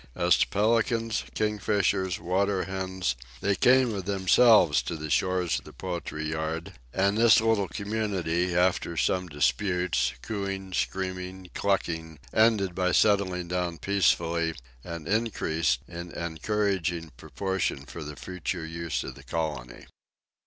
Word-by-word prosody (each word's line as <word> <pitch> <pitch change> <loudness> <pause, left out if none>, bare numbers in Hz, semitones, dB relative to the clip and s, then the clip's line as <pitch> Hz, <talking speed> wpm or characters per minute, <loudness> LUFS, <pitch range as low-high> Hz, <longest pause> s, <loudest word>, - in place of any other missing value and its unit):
As - - +4
to - - +3
pelicans, 115 +1 +1
kingfishers, 100 -2 0
water 95 +1 0
hens, 95 -5 -2 0.2
they 100 - +1
came 125 +2 +4
of 95 -3 -4
themselves 95 -3 +5
to 85 - -4
the 75 -1 -5
shores 90 -2 +1
of - - -21
the - - -12
poultry 85 -4 -4
yard, 80 +4 -3 0.2
and 100 - +1
this 115 -1 +7
little 110 -3 +2
community, 95 -5 -1
after 90 -2 +1
some 90 +2 +1
disputes, 90 +4 +1
cooing, 95 -3 -4
screaming, 95 0 -3
clucking, 80 -5 -1 0.2
ended 110 -4 +3
by 90 0 +1
settling 95 -4 +2
down 90 -1 -2
peacefully, 85 -3 +1 0.3
and 85 -2 -7
increased 85 - 0
in 85 0 -7
encouraging 85 -1 -1
proportion 95 -8 -3
for 80 +3 -8
the 75 0 -7
future 90 -1 -4
use 85 0 -3
of - - -6
the - - -14
colony. 75 -7 -4
95 Hz, 130 wpm, -27 LUFS, 85-100 Hz, 0.3 s, this